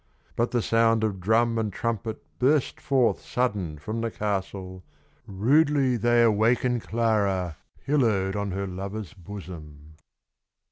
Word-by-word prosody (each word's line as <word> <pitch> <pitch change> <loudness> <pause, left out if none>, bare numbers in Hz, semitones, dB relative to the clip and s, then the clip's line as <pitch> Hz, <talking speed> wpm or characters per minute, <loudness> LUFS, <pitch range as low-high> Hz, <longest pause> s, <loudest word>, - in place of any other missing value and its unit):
But 120 +1 +1
the 120 -2 0
sound 115 -1 +3
of 100 -3 -1
drum 115 +4 +2
and 110 -2 -1
trumpet 115 0 -3 0.2
Burst 140 +2 +2
forth 130 -4 +2
sudden 100 -11 -1
from 110 +10 -4
the 115 - -1
castle. 95 -3 -4 0.4
Rudely 135 +6 +3
they 120 +1 +3
awaken 115 +3 +2
Clara, 100 -8 0 0.3
Pillowed 110 -9 +1
on 100 -1 -2
her 95 +1 -3
lover's 100 +2 -6
bosom. 85 -6 -10
110 Hz, 125 wpm, -26 LUFS, 95-120 Hz, 0.4 s, sound